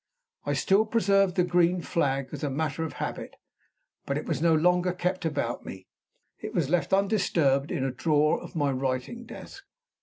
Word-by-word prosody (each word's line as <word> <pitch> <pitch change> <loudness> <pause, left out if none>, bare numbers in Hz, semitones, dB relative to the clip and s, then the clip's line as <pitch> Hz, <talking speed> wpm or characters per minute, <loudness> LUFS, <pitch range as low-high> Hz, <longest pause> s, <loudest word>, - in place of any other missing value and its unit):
I - - +1
still 205 +3 +2
preserved 195 -4 +2
the 180 - +3
green 175 0 +2
flag 135 -4 -1
as - - -7
a 145 - 0
matter 155 +2 -2
of 160 - -5
habit; - - -5 0.7
but 140 - -1
it 150 - -4
was 150 -4 -2
no 165 -1 +4
longer 180 +2 +2
kept 180 0 -2
about 140 -7 -2
me; 95 -1 -9 0.5
it - - -7
was 155 -4 0
left 175 -3 +1
undisturbed 180 -9 +2
in 130 - -2
a 135 - 0
drawer 150 +3 +1
of - - -11
my 145 -3 +1
writing 130 - -3
desk. 395 - -10
160 Hz, 180 wpm, -27 LUFS, 140-180 Hz, 0.7 s, no